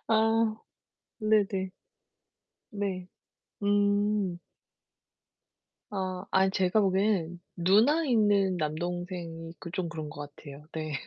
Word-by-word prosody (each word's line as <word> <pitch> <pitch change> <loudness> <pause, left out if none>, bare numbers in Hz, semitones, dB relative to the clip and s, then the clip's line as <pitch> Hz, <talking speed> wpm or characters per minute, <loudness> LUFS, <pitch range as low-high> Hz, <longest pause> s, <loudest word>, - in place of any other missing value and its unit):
아. 225 0 +3 0.6
네네. 205 -4 +2 1.0
네. 190 -3 -2 0.6
음. 205 -2 +2 1.5
아. 185 -2 -3
아이, 190 0 +4
제가 190 +1 +2
보기엔 190 -3 +1 0.2
누나 215 - +4
있는 205 -7 +3
남동생이 170 +1 -4
그 170 - -7
좀 180 -1 -2
그런 155 -3 -5
것 145 0 -8
같아요 145 0 -11
네. 155 -1 -4
190 Hz, 165 characters per minute, -29 LUFS, 170-205 Hz, 1.5 s, 아이